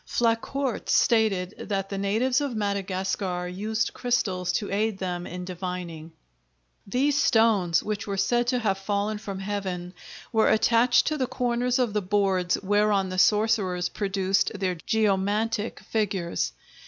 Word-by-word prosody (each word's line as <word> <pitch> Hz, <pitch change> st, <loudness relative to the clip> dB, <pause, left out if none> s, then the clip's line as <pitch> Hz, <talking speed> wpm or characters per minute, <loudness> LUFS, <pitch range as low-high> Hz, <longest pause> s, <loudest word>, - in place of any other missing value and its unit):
Flacourt 240 Hz, +3 st, -1 dB
stated 210 Hz, -5 st, +2 dB
that 195 Hz, -2 st, -3 dB
the 200 Hz, -, -4 dB
natives 230 Hz, +7 st, +1 dB
of 280 Hz, -5 st, -2 dB
Madagascar 190 Hz, -3 st, -2 dB
used 215 Hz, +4 st, -2 dB
crystals 200 Hz, -8 st, 0 dB
to 205 Hz, -, -2 dB
aid 210 Hz, +1 st, 0 dB
them 180 Hz, -2 st, -4 dB
in 180 Hz, 0 st, -6 dB
divining. 180 Hz, -3 st, -6 dB, 0.8 s
These 270 Hz, +7 st, +1 dB
stones, 205 Hz, -7 st, +3 dB
which 210 Hz, 0 st, -3 dB
were 200 Hz, -1 st, -2 dB
said 240 Hz, +5 st, +1 dB
to 250 Hz, 0 st, +2 dB
have 200 Hz, -5 st, 0 dB
fallen 205 Hz, +2 st, -1 dB
from 200 Hz, -2 st, -6 dB
heaven, 190 Hz, -3 st, -4 dB, 0.4 s
were 220 Hz, -1 st, +4 dB
attached 230 Hz, +2 st, +4 dB
to 310 Hz, -, 0 dB
the 255 Hz, -, 0 dB
corners 245 Hz, 0 st, 0 dB
of 245 Hz, -5 st, 0 dB
the 210 Hz, -, +1 dB
boards 190 Hz, -2 st, +1 dB
whereon 205 Hz, -1 st, +2 dB
the 185 Hz, 0 st, -2 dB
sorcerers 210 Hz, -4 st, +2 dB
produced 195 Hz, -1 st, 0 dB
their 190 Hz, -2 st, -1 dB
geomantic 210 Hz, +3 st, 0 dB
figures. 195 Hz, -6 st, -1 dB
205 Hz, 140 wpm, -26 LUFS, 185-225 Hz, 0.8 s, were